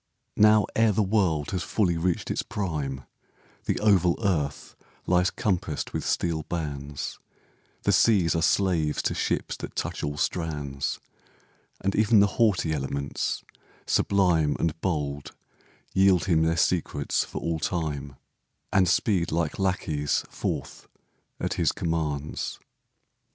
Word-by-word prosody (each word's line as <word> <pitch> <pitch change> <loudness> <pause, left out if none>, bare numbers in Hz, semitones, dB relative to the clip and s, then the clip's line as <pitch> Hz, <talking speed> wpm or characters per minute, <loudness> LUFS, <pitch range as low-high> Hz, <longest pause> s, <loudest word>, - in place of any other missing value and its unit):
Now, 105 0 +6
ere 115 -1 +4
the 105 +1 +2
world 95 -8 +1
has 95 -2 -1
fully 90 -1 +1
reached 85 +1 -1
its - - 0
prime, 75 -9 -3 0.6
The - - 0
oval 95 -5 +4
earth 75 -7 -1 0.3
lies 90 0 +3
compassed 90 -7 -2
with - - -2
steel 85 -2 0
bands, 75 -4 -4 0.6
The - - +3
seas 95 -8 +4
are 80 - +1
slaves 85 -3 +1
to - - 0
ships - - -1
that - - -8
touch - - -3
all 75 0 -2
strands, 75 -5 -2 0.8
And 95 +1 0
even 110 0 +5
the 100 - +7 0.2
haughty 95 -8 +3
elements, 70 -1 -2 0.4
sublime 90 -7 +2
And 80 0 -1
bold, 75 -6 -2 0.6
yield 95 -2 +4
him 85 -4 +3
their 80 +1 +2
secrets 80 -4 +1
for - - -6
all 85 -1 -2
time, 75 -5 -3 0.6
And 95 -2 +4
speed 90 -3 +1
like 80 +1 -1
lackeys 80 -6 0
forth - - -4 0.5
at - - -1
his - - +2
commands. 75 -3 -3
85 Hz, 130 wpm, -26 LUFS, 75-95 Hz, 0.8 s, the